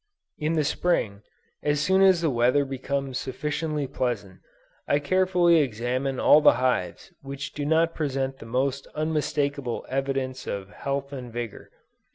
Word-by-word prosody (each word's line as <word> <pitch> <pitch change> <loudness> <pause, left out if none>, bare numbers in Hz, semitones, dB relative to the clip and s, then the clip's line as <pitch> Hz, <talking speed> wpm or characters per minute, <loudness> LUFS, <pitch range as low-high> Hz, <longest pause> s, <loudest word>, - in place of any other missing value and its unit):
In 155 +2 0
the 155 -2 +2
Spring, 110 - 0 0.4
as 145 0 +1
soon 190 +5 +3
as 190 -3 +5
the 160 -3 +1
weather 125 +4 +3
becomes 135 0 -3
sufficiently 150 +2 -3
pleasant, 120 -8 -3 0.5
I 145 - +3
carefully 180 +2 +3
examine 130 +1 -1
all 150 - +6
the - - +7
hives 125 -8 -1
which 140 +1 -6
do 145 -1 -3
not 165 +1 +3
present 135 -3 -2
the 115 - -10
most 130 +3 -1
unmistakable 145 -4 -1
evidences 135 -1 -2
of 100 0 -5
health 140 +4 -4
and 125 -3 -7
vigor. 120 -2 -6
140 Hz, 145 wpm, -26 LUFS, 125-150 Hz, 0.5 s, the